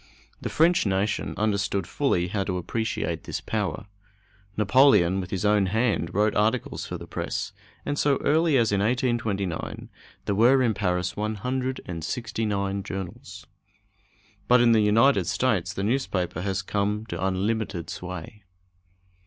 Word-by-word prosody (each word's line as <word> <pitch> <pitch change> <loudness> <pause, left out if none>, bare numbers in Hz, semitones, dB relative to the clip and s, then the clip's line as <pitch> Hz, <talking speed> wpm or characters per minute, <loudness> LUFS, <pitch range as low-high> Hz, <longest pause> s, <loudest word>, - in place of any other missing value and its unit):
The - - -3
French 165 -6 +3
nation 100 +2 -1
understood 100 -3 0
fully 90 - 0
how 100 +1 -1
to 90 -2 -2
appreciate 110 +5 -3
this - - -3
power. - - -3 0.7
Napoleon, 105 -5 +4
with 90 - -7
his 95 +2 -2
own 105 -2 +3
hand, 110 -4 0
wrote 105 +2 +2
articles 110 +3 0
for - - -5
the - - -9
press, - - -4 0.3
and 145 0 -2
so 140 -2 +3
early 160 -1 +3
as 115 -3 +2
in 100 - +2
1829 110 -6 -1 0.4
there - - 0
were 125 +6 +5
in 115 -3 +2
Paris 90 -3 -1
169 105 -3 -2
journals. 95 -2 -7 1.0
But 125 0 +6
in 120 0 +5
the 110 -1 +5
United 115 +7 +4
States 105 -8 0
the 100 -1 -4
newspaper 100 -8 -1
has 95 0 -2
come 105 +2 -1
to 85 -4 -5
unlimited 95 -2 -1
sway. 90 +3 -7
105 Hz, 135 wpm, -25 LUFS, 95-120 Hz, 1.0 s, But